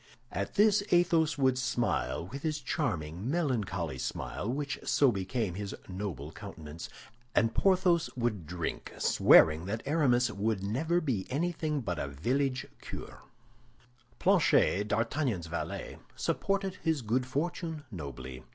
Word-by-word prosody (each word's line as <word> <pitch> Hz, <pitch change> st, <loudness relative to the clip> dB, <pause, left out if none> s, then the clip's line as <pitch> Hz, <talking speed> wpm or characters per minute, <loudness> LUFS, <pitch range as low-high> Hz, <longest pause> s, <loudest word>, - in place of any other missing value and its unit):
At -, -, -3 dB
this 210 Hz, 0 st, +5 dB
Athos 165 Hz, -3 st, +3 dB
would 130 Hz, -2 st, +3 dB
smile, 125 Hz, -8 st, 0 dB
with 135 Hz, +9 st, -7 dB
his 155 Hz, -1 st, -1 dB
charming, 90 Hz, -, -2 dB
melancholy 105 Hz, -, -1 dB
smile, 105 Hz, -, -3 dB
which 145 Hz, +1 st, -3 dB
so 140 Hz, -3 st, +4 dB
became 100 Hz, 0 st, -2 dB
his 100 Hz, +1 st, -5 dB
noble 90 Hz, -7 st, -5 dB
countenance, 80 Hz, +1 st, -8 dB, 0.5 s
and 115 Hz, 0 st, +3 dB
Porthos 180 Hz, -3 st, +3 dB
would 115 Hz, -9 st, -1 dB
drink, 85 Hz, 0 st, -4 dB
swearing 80 Hz, +1 st, +6 dB
that 110 Hz, +4 st, -3 dB
Aramis 135 Hz, -5 st, +3 dB
would 100 Hz, -1 st, -1 dB
never 155 Hz, -, +1 dB
be 120 Hz, -, -1 dB
anything 155 Hz, 0 st, -1 dB
but 90 Hz, -8 st, -3 dB
a -, -, -2 dB
village 130 Hz, -, 0 dB, 0.2 s
curé. -, -, -7 dB, 1.0 s
Planchet, 165 Hz, -, +3 dB
D'Artagnan's 115 Hz, -, 0 dB
valet, 85 Hz, +1 st, -5 dB, 0.2 s
supported 195 Hz, -1 st, -1 dB
his 160 Hz, -6 st, +1 dB
good 125 Hz, +4 st, 0 dB
fortune 160 Hz, +2 st, -2 dB
nobly. 65 Hz, -, -7 dB
125 Hz, 125 wpm, -31 LUFS, 95-155 Hz, 1.0 s, swearing